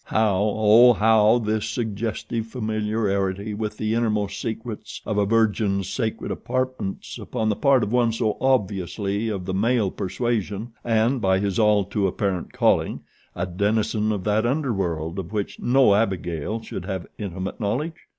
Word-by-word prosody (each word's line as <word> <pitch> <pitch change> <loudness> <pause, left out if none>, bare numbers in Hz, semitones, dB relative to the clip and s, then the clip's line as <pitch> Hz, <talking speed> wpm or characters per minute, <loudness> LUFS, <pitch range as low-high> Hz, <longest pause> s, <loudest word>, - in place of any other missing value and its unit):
How, 110 -3 +2 0.2
Oh 110 +3 +7
how, 110 +1 +4
this 110 -2 -1
suggestive 115 0 -3
familiarity 105 -3 -1
with 105 0 -4
the 110 0 -1
innermost 105 -3 0
secrets 115 -1 -5
of 105 -1 -1
a 100 - +2
virgin's 105 -3 +1
sacred 110 +2 -2
apartments 130 -6 -3
upon 110 -1 -2
the 105 - +1
part 135 -2 +3
of 105 - -2
one 120 -2 +3
so 110 -1 0
obviously 100 -3 0
of 95 -4 -4
the 95 - -3
male 110 0 +1
persuasion 110 +1 -2
and, 115 +2 +2
by 95 -1 +3
his 100 +1 -1
all 105 -2 +4
too 100 +1 0
apparent 95 -1 -2
calling, - - +1 0.3
a 85 - -1
denizen 105 +3 0
of 100 -3 -2
that 105 +2 +1
underworld 95 - -1
of 95 0 -6
which 105 -2 -3
no 125 -4 +4
Abigail 95 -1 -1
should 90 - -6
have 95 -3 -4
intimate 95 0 -5
knowledge? 125 +10 -1
105 Hz, 150 wpm, -24 LUFS, 100-115 Hz, 0.3 s, Oh